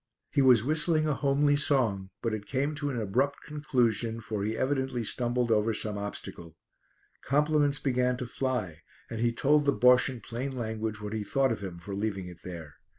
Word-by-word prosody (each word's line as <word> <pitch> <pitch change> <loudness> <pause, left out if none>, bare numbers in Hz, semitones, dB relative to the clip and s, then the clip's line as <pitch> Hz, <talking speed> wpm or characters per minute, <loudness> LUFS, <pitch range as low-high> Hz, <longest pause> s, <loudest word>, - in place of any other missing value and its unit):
He 140 - +3
was 125 -5 +6
whistling 155 +2 +1
a 150 - +2
homely 145 +1 +2
song, 115 -10 +1
but 115 -2 0
it 105 -1 -5
came 140 +3 -1
to 145 -1 -3
an 125 -4 -2
abrupt 130 +7 0
conclusion, 120 -6 0
for 110 -2 -4
he 110 +2 -2
evidently 130 -2 -1
stumbled 120 +1 0
over 110 0 +2
some 105 0 -2
obstacle. 85 -5 -7 0.7
Compliments 145 0 +2
began 125 -2 +1
to 125 - -4
fly, 120 - -3 0.3
and 115 - -4
he 120 +1 +2
told 145 +5 +2
the 140 - +4
Bosche 125 +2 +5
in 130 -2 -6
plain 125 +5 -4
language 110 -2 -3
what 105 0 -5
he 110 -1 -2
thought 135 +4 +1
of 110 - -3
him 95 -3 -6
for 90 +4 -8
leaving 100 -2 -2
it 90 -1 -11
there. 85 -5 -8
120 Hz, 190 wpm, -29 LUFS, 105-140 Hz, 0.7 s, was